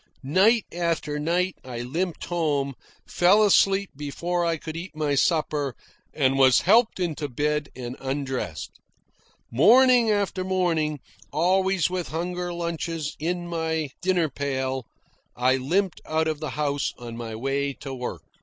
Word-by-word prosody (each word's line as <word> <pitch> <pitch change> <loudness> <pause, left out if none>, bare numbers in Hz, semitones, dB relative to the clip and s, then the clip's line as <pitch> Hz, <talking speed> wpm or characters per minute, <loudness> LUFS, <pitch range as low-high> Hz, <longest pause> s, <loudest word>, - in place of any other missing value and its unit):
Night 195 - +4
after 165 -3 -1
night 175 +4 0
I 120 -2 -6
limped 165 +8 -3
home, 145 -5 0 0.3
fell 195 +5 +4
asleep 195 -1 +3
before 170 +5 -2
I 165 -1 +1
could 160 +1 -7
eat 170 0 -7
my 150 -2 0
supper, 145 -3 +1 0.4
and 135 -2 +1
was 130 -1 +6
helped 220 +2 +4
into 155 -4 -2
bed 150 +3 -1
and 125 -1 -6
undressed. 135 - -4 0.7
Morning 240 - +6
after 200 -3 0
morning, 165 -6 0 0.3
always 185 +3 +2
with 180 -2 -3
huger 175 +2 -3
lunches 170 -2 -3
in 175 +2 -2
my 160 -3 -2
dinner 180 -3 +2
pail, 130 -3 -3 0.5
I 130 +2 +2
limped 180 +8 0
out 160 0 0
of 155 -2 -2
the 155 -2 -4
house 145 -1 -1
on 120 -1 -8
my 115 -1 -6
way 135 +4 -1
to 135 0 -8
work. 125 -1 -5
160 Hz, 140 wpm, -25 LUFS, 140-180 Hz, 0.7 s, was